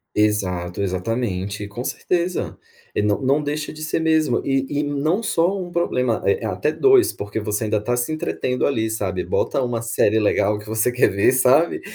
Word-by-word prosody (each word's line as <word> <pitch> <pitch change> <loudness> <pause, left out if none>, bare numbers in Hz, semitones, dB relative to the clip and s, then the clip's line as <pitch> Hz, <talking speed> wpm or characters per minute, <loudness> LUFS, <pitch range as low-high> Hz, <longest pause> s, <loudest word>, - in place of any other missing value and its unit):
Exato. 95 -4 0
Exatamente. 100 +1 -2
Com 120 +5 -6
certeza. 180 0 -2 0.4
E, - - +1
não 105 -1 +1
não 140 +3 +2
deixa 150 +1 -3
de 155 0 -10
ser 160 +1 -1
mesmo. 160 -5 +2
E 135 -1 0
e - - 0
não 150 +8 0
só 180 -2 +1
1 175 -1 -6
problema, 125 -9 0
é 450 - +1
é - - -1
até - - -1
2, 400 -3 +4
porque 105 +2 -5
você 105 +1 -2
ainda 105 -1 0
tá 120 +4 -1
se 120 +5 -1
entretendo 130 -4 -1
ali, 110 -5 0
sabe. 95 -4 -2
Bota - - 0
1 120 -2 -2
série 110 -1 +2
legal 105 -1 +2
que 105 - -12
você 110 +3 +1
quer 125 - +3
ver, 100 +5 +2
sabe, 130 +6 +3
120 Hz, 190 wpm, -21 LUFS, 105-155 Hz, 0.4 s, 2